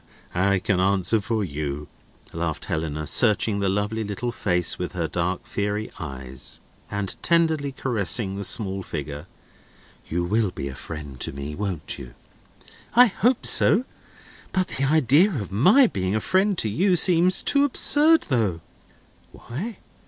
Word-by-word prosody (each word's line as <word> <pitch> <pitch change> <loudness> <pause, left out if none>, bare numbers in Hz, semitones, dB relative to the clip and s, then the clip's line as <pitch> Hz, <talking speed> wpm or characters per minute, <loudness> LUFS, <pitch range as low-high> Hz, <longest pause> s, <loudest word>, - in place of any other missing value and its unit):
"I 100 +2 +2
can 95 0 -1
answer 95 +3 +2
for 110 +1 -2
you," 75 -3 -5 0.5
laughed - - -4
Helena, 75 -1 -3
searching 105 +2 +3
the 100 -1 0
lovely 105 +3 -2
little 110 +4 -4
face 90 -5 -1
with 90 - -4
her 85 -3 -2
dark, 90 +7 -3
fiery 105 -2 -3
eyes, 65 -5 -6 0.3
and 100 -2 -3
tenderly 160 -4 +1
caressing 110 -5 0
the 100 - -5
small 100 -2 +2
figure. 75 -1 -7 0.8
"You 85 +2 -2
will 105 +3 0
be 70 -6 -6
a - - -7
friend 75 -1 -9
to - - -2
me, 70 +2 -7
won't 95 -3 -4
you?" - - -11 0.8
"I 245 +1 +8
hope 240 +3 0
so. 230 +5 +4 0.7
But 185 -1 0
the 135 - -2
idea 155 - +4
of 100 -7 -5
my 185 - +5
being 95 - -2
a - - +1
friend 190 - +1
to 110 - +1
you 180 - +1
seems 180 +1 +4
too 280 0 +4
absurd, 300 +3 +5
though." 105 -10 0 0.7
"Why?" 185 - -7
105 Hz, 150 wpm, -23 LUFS, 90-145 Hz, 0.8 s, I